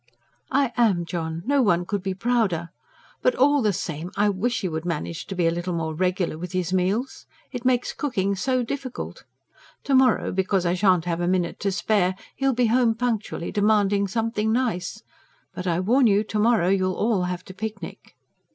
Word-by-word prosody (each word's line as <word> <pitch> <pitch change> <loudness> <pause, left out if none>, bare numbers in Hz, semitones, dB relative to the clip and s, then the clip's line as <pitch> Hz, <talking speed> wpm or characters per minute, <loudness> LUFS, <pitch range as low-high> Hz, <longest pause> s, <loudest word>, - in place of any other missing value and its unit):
"I 270 -2 +1
am, 200 -8 +3
John 165 -1 -4
no 280 +1 +3
one 175 -6 +2
could 200 +1 -2
be 190 0 -3
prouder. 195 -6 0 0.5
But - - +2
all 285 +1 +4
the 215 -3 +2
same 165 -2 -4
I 205 +1 +3
wish 235 +6 -1
he 190 - -1
could 160 -2 -3
manage 170 -1 -4
to 195 - -5
be 180 -2 +1
a 165 - +3
little 175 +1 -3
more 160 -1 -2
regular 180 -1 -1
with 180 +1 -6
his 185 -1 -1
meals. 195 +8 -1 0.2
It 245 -1 -6
makes 250 -1 +1
cooking 200 -9 -1
so 255 +5 0
difficult. 260 +1 -6 0.6
To 280 - -1
morrow, 260 -3 +4
because 190 0 0
I 175 - +2
shan't 185 -2 +3
have 175 -1 -1
a 175 - 0
minute 180 -1 0
to 200 - 0
spare, 190 -1 +1 0.2
he'll 270 0 +1
be 245 0 +2
home 235 0 +3
punctually, 225 -7 -2
demanding 205 -1 +2
something 220 +1 -1
nice. 220 -4 -1 0.5
But 180 0 -5
I 170 0 +1
warn 240 +7 +3
you, 205 0 +3
to 215 0 -3
morrow 215 -5 +3
you'll 185 -1 +1
all 210 -5 +1
have 180 0 -4
to 185 - -10
picnic!" 220 +3 -7
200 Hz, 190 wpm, -24 LUFS, 180-235 Hz, 0.6 s, all